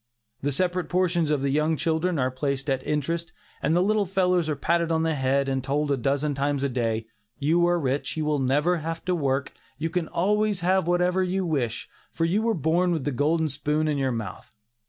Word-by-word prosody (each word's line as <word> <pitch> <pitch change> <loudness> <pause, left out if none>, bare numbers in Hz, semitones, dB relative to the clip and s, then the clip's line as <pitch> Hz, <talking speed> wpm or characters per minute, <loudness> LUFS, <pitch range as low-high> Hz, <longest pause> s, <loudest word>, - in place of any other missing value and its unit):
The 145 - 0
separate 180 +3 -1
portions 175 -3 +1
of 145 -3 +1
the 140 - +1
young 155 +2 +1
children 165 +3 0
are 130 -1 +1
placed 135 +1 -2
at 135 -1 0
interest, 160 +3 -1 0.3
and 155 +3 +1
the 175 - +4
little 210 0 +1
fellows 180 -3 +1
are 150 - 0
patted 170 +3 0
on 160 0 +1
the 165 0 +1
head, 135 0 +1
and 135 -1 -1
told 145 +2 0
a - - +3
dozen 140 +3 0
times 140 0 -1
a 140 - +1
day, 115 -3 -1 0.3
"you 165 +5 +2
are 175 0 +2
rich; 140 +1 -2
you 155 - -1
will 150 -1 +1
never 145 +7 +2
have 165 +1 -5
to 185 - +1
work, 140 -4 -1 0.2
you 160 +2 -2
can 170 -1 -1
always 210 +2 +1
have 185 0 +2
whatever 180 +1 +2
you 185 +1 0
wish, 135 -9 -2 0.2
for 165 - 0
you 190 +6 +1
were 230 0 +1
born 170 +3 +1
with 155 -5 -1
a - - +1
golden 155 +5 +1
spoon 150 +2 -1
in 150 -2 0
your 135 -1 +1
mouth." 110 -1 -6
155 Hz, 220 wpm, -25 LUFS, 140-175 Hz, 0.3 s, the